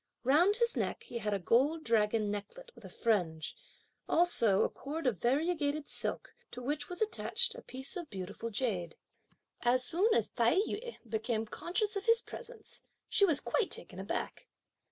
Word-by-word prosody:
Round 325 +11 +4
his 470 +1 +2
neck - - -2
he 235 - -5
had 210 -1 -2
a 200 - +1
gold 270 - +2
dragon 215 -2 +2
necklet 480 - -7
with - - -17
a - - -9
fringe; 175 -9 0 0.5
also 235 - +4
a - - +1
cord 305 +3 -6
of 230 -9 +1
variegated 295 - 0
silk, - - -3 0.2
to 245 - -8
which 290 +4 -2
was 360 +4 0
attached 460 +2 0
a - - -10
piece 265 +6 -4
of 345 -5 -6
beautiful 200 +4 -6
jade. 200 -8 -2 0.7
As 250 +1 +3
soon 370 - +2
as - - +2
Tai - - +2
yü 445 +4 -2
became 220 0 -1
conscious 400 - -2
of 400 +3 -4
his 460 0 +5
presence, 485 -1 -9 0.3
she 400 - +5
was 325 -7 +5
quite 450 - 0
taken - - -4
aback. - - -4
275 Hz, 170 wpm, -32 LUFS, -, 0.7 s, his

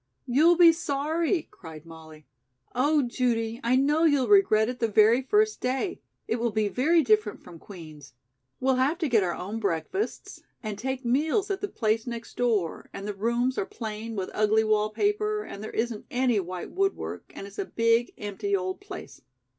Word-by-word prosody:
"You'll 310 +7 +4
be 340 -2 +8
sorry," 325 +2 -1
cried 160 -6 -11
Molly. 160 -2 -13 0.5
"Oh, 290 +4 +2
Judy, 235 -2 -1
I 240 +2 +2
know 295 +5 +2
you'll 285 -5 +3
regret 300 - +5
it 250 0 -5
the 230 - +1
very 220 +3 +4
first 425 +10 +1
day. 265 +9 -2 0.3
It 230 - 0
will 235 0 0
be 215 -1 0
very 315 +9 +3
different 215 -3 +1
from 170 -2 -12
Queen's. 155 -9 -12 0.4
We'll 260 0 +2
have 275 +6 +2
to 335 -4 -1
get 230 -5 +3
our 175 -2 -1
own 205 +5 -5
breakfasts, 200 - -3 0.2
and 215 -2 -5
take 265 0 -4
meals 315 - +1
at 390 - -3
the 410 - -1
place 220 - -1
next 235 -1 -7
door, 215 -9 -1
and 195 - -7
the 210 - -3
rooms 235 +5 0
are - - -1
plain 220 0 -6
with 190 -2 -4
ugly 215 +1 +3
wall 215 -1 +2
paper, 420 - 0
and 200 - -9
there 220 - -5
isn't 225 -1 -3
any 245 -3 +1
white 180 -1 -6
woodwork, 390 +1 -2
and - - -7
it's 200 +1 -11
a - - -1
big 230 +1 +1
empty 205 0 -2
old 185 0 -3
place. 395 - -10
235 Hz, 185 wpm, -27 LUFS, 210-285 Hz, 0.5 s, be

